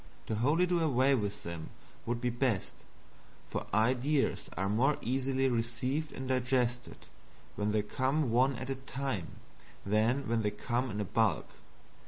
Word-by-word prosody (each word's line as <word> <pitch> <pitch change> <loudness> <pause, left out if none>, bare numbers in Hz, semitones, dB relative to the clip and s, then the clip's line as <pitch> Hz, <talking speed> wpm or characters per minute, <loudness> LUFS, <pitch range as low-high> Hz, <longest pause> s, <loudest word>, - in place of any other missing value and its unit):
To - - -3
wholly 145 +11 +3
do 175 -1 +1
away 140 -4 +3
with 105 -6 -1
them 85 -2 -6 0.4
would 120 0 0
be 125 0 0
best, 120 -5 0 0.7
for - - -4
ideas 130 +7 +1
are 95 +2 0
more 125 +8 +2
easily 135 +2 0
received 125 +5 -1
and 130 - -6
digested 125 -1 0 0.5
when 105 0 0
they 105 -1 +1
come 130 +4 0
one 130 +3 +3
at 130 +3 -4
a - - -1
time 130 -10 -3 0.5
than 110 +7 +2
when 115 0 +1
they 105 - +1
come 120 +5 -2
in 105 -1 -2
bulk. 110 0 +1
125 Hz, 150 wpm, -32 LUFS, 110-135 Hz, 0.7 s, wholly